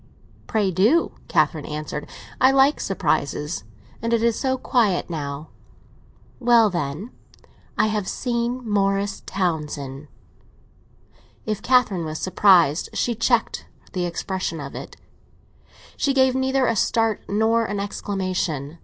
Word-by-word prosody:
"Pray 210 -4 +1
do," 215 - +3 0.2
Catherine 155 -4 +1
answered; 150 0 -5 0.3
"I 260 - +7
like 270 +2 +4
surprises. 150 - -1 0.4
And 230 +1 -1
it 230 -1 +2
is 235 -1 +3
so 260 -1 0
quiet 215 -9 +1
now." 145 -1 -5 0.9
"Well, 235 -3 +5
then, 170 - -3 0.7
I - - +4
have 210 -3 -1
seen 240 0 -2
Morris 200 -1 0
Townsend." 150 -6 -3 1.4
If 215 -1 -2
Catherine 235 -9 +3
was 155 0 -4
surprised, 180 -4 +4
she 240 - 0
checked 230 +1 0 0.3
the 180 -1 -1
expression 175 -1 -3
of 140 -1 -7
it; - - -8 1.0
she 275 -1 +1
gave 260 -1 +4
neither 265 0 +1
a 230 - +1
start 225 0 +1
nor 225 +3 +2
an 205 -1 -3
exclamation. 185 -7 -3
200 Hz, 120 wpm, -23 LUFS, 165-235 Hz, 1.4 s, I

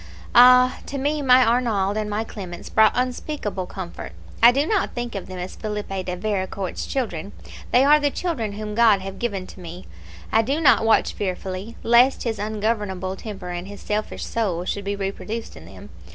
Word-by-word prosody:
Ah! 250 +1 +7
to 280 - -4
me 290 +2 -1
my 255 -2 +6
Arnauld 225 -4 +1
and 215 -1 -2
my 210 +1 -1
Clemence 185 -5 -8
brought 220 -1 +5
unspeakable 250 -6 -3
comfort. 180 -3 -8 0.3
I 235 +1 +9
do 280 +4 +1
not 410 +2 0
think 240 -1 -4
of 195 - -5
them 185 - -8
as 180 +1 -6
Philippe 210 -3 -4
de 180 -1 -4
Vericourt's 190 -1 -3
children; 200 -8 -3 0.4
they 250 - +5
are 300 +1 +6
the 290 -1 +1
children 270 - -3
whom 210 0 -5
God 215 -3 +4
have 195 0 -7
given 200 -6 -2
to 185 - -13
me. 175 +1 -9 0.5
I 225 - +4
do 275 +7 -1
not 285 -7 +5
watch 225 - +3
fearfully, 190 +2 -4
lest 240 +3 +4
his 225 -3 -2
ungovernable 205 -3 -2
temper 195 -3 -8
and 175 +1 -5
his 205 0 -10
selfish 210 +1 -3
soul 185 -7 -2
should 200 +1 -3
be 200 0 -1
reproduced 200 +3 -5
in - - -12
them. - - -13
210 Hz, 185 wpm, -23 LUFS, 190-240 Hz, 0.5 s, I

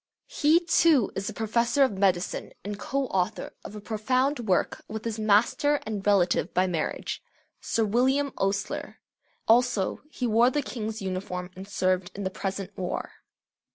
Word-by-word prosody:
He 325 -9 +4
too 320 - +4
is 195 +1 -2
professor 235 +5 +1
of 265 - +3
medicine, 190 -2 0
and 205 0 -4
co 275 +4 -1
author 185 -7 -2
of 210 - -9
a - - -6
profound 255 +6 0
work 195 -6 0
with 220 +1 -6
his 225 -1 -3
master 235 +8 +3
and 210 -3 -4
relative 185 -4 +2
by 185 - +4
marriage 170 -4 -3 0.4
Sir 225 - 0
William 265 +6 +2
Osler. 195 0 -2 0.5
Also, 235 -4 +3
he 255 - -3
wore 230 +2 +4
the 290 +2 -1
King's 220 -4 -5
uniform 185 -1 -4
and 190 +1 -9
served 185 -2 0
in 200 - -4
the 190 - -2
present 195 0 -4
war. 180 -1 -3
215 Hz, 155 wpm, -27 LUFS, 190-250 Hz, 0.5 s, He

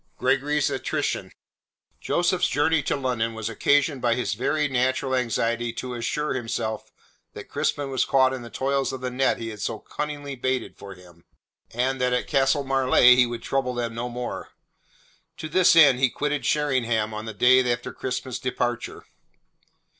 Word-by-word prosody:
GREGORY'S 145 +2 +1
ATTRITION - - -2 0.7
Joseph's 175 +1 +1
journey 150 +3 +2
to - - -1
London 120 -4 -2
was 110 0 -4
occasioned 140 +5 +1
by 120 -1 +2
his 125 -5 -1
very 150 +7 0
natural 130 0 0
anxiety 120 -1 0
to 125 +1 -5
assure 125 +5 -2
himself 115 -3 -4 0.4
that - - -9
Crispin 145 -2 -2
was 130 - +1
caught 130 -1 +3
in 130 - -5
the 120 - -9
toils 135 +2 -1
of 130 - -6
the 125 0 -3
net 130 +2 +1
he 115 -1 -5
had 105 -2 -8
so - - -2
cunningly 145 -1 -5
baited 130 0 -2
for 100 -1 -10
him, 90 -2 -18 0.5
and 130 +2 -1
that 125 0 +1
at 125 - 0
Castle 135 0 +2
Marleigh 130 -2 +5
he 125 -1 +4
would 120 0 -6
trouble 130 -2 -1
them 120 -1 -3
no 120 +2 -4
more. 125 0 -5 0.9
To - - -5
this 180 +2 +4
end 140 -6 +7
he 130 -1 +3
quitted 145 -1 -2
Sheringham 120 -7 0
on 105 +1 -5
the 110 - -6
day 125 +4 +5
after 120 0 -3
Crispin's 130 -1 -4
departure. 125 -2 -3
130 Hz, 170 wpm, -24 LUFS, 120-135 Hz, 0.9 s, end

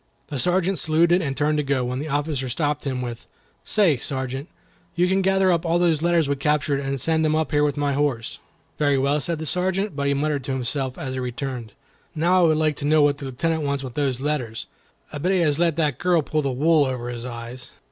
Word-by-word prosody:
The 140 - -3
Sergeant 180 +4 +1
saluted 170 +3 +3
and 140 -4 -3
turned 150 0 +1
to - - +1
go, 135 -3 0
when 125 +1 -3
the 150 - -4
officer 145 -2 -1
stopped 150 +2 -1
him 130 -2 -2
with, 120 -1 -7 0.4
"Say, 190 -10 +3
Sergeant, 130 +2 -3 0.5
you 175 +1 +3
can 190 +1 +2
gather 190 0 +3
up 170 -2 +1
all 170 0 +1
those 170 -3 +2
letters 170 -2 +2
we 140 - +1
captured 145 0 +1
and 135 0 -3
send 160 +4 +1
them 155 0 +2
up 155 -2 0
here 145 0 +3
with 145 0 0
my 145 -1 0
horse." 135 -5 -1 0.4
"Very 145 -2 +3
well," 140 +3 +1
said 170 +3 -1
the 160 - -5
Sergeant, 185 +3 0
but 140 0 -1
he 140 - +2
muttered 145 -1 -1
to 135 - -2
himself, 130 +1 -2
as 130 -1 -4
he 130 - -3
returned, 125 -3 -5 0.4
"Now, 175 +3 +3
I - - +6
would 155 -1 +3
like 155 -2 +1
to 145 - -4
know 155 0 +4
what 145 0 +2
the 140 - -6
Lieutenant 160 +5 -1
wants 140 -1 -2
of 130 -2 -7
those 135 -3 -1
letters. 135 -6 -2 0.5
I 145 - -4
bet 180 +6 +1
he 185 - +2
has 150 -2 +1
let 170 -3 +2
that 150 -6 0
girl 175 -3 +2
pull 155 +1 -1
the 140 -2 -1
wool 150 +3 +3
over 125 -2 -3
his 120 -1 -6
eyes." 120 +1 -7
145 Hz, 240 wpm, -23 LUFS, 135-160 Hz, 0.5 s, I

